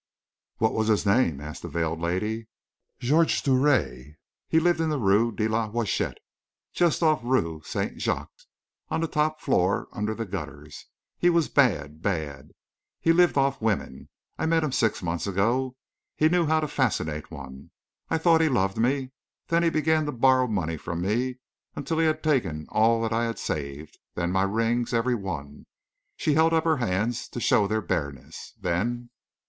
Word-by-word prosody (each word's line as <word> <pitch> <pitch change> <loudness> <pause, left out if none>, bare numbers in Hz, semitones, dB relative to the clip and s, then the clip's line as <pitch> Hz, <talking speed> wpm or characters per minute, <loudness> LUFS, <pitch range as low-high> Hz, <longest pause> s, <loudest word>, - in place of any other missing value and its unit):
"What 110 0 +1
was 110 -1 0
his 105 -2 +2
name?" 100 - +2
asked 75 +1 -8
the - - -6
veiled 80 -1 -2
lady. 105 +7 -2 0.5
"Georges 155 +7 +3
Drouet 130 - +1 0.3
he 160 - +3
lived 170 0 +2
in 160 - +1
the 150 - 0
Rue 110 0 +3
de 110 +1 -1
la 110 0 0
Huchette, 115 -2 -1 0.6
just 170 -1 +2
off 155 -1 +3
the 120 - -9
Rue 85 -12 0
Saint - - -4
Jacques - - -2 0.6
on - - -1
the 165 - 0
top 155 0 0
floor, 95 +3 +1
under 105 +1 -3
the 115 - -4
gutters. 75 -6 -8 0.3
He 175 - +4
was 170 -2 +2
bad 80 - +1
bad; 75 -9 -3 0.5
he 165 - +3
lived 175 -2 +4
off 135 -1 +1
women. 110 -3 -2 0.3
I - - 0
met 165 0 +2
him 150 - -1
six 115 -6 0
months 85 +2 -2
ago. 120 +7 0 0.4
He 155 - +3
knew 175 -1 +2
how 160 +1 +2
to 155 - -1
fascinate 75 - -1
one; 70 -3 -10 0.4
I - - +1
thought 160 0 +4
he 160 - +3
loved 100 -6 0
me. 130 +2 0 0.4
Then 170 0 +3
he 170 - +3
began 155 -1 +1
to - - -1
borrow 130 0 +3
money 85 -7 -2
from 85 +3 -5
me, 120 +7 0 0.4
until 160 +3 -2
he 165 - +3
had 155 0 -1
taken 115 - 0
all 115 +1 +3
that 115 0 -1
I 115 +1 +1
had 115 0 -3
saved; 75 +1 -5 0.2
then 85 0 -1
my 95 +1 +2
rings 115 +4 0
every 120 +2 +1
one!" 85 -10 -6 0.5
She 150 - +1
held 160 +2 +4
up 160 - +2
her 160 -2 +2
hands 115 +1 -1
to - - -6
show 105 -3 +3
their 110 +1 0
bareness. 70 -4 -5
"Then...." 115 +7 -2
115 Hz, 180 wpm, -26 LUFS, 90-145 Hz, 0.6 s, He